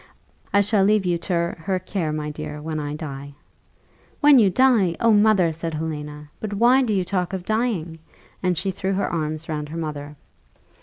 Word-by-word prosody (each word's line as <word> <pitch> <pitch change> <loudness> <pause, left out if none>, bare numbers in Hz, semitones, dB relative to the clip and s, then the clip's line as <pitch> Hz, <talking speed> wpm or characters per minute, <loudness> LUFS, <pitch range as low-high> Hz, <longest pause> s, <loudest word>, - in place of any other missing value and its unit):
I 200 - +4
shall 205 -1 +2
leave 210 0 +3
you 175 -1 +1
to 170 -1 -1
her 185 +3 -1
care, 185 -3 -3
my 150 0 -3
dear, 150 0 -6
when 155 +1 -4
I 145 0 -4
die." 140 -2 -7 0.8
"When 290 -3 +7
you 205 -4 +5
die! 220 -6 +3
Oh, 230 - +4
mother!" 205 -5 +4
said 165 0 -4
Helena, 150 -1 -6
"but 215 -1 -4
why 245 +5 +5
do 245 -4 0
you 190 -3 +1
talk 180 0 -2
of 185 -2 -4
dying?" 215 -8 -1 0.4
and 180 -2 0
she 190 +3 -1
threw 190 +1 -2
her 195 - 0
arms 155 -1 -3
round 150 -2 -4
her 165 - -6
mother. 150 -2 -5
175 Hz, 190 wpm, -23 LUFS, 155-200 Hz, 0.8 s, When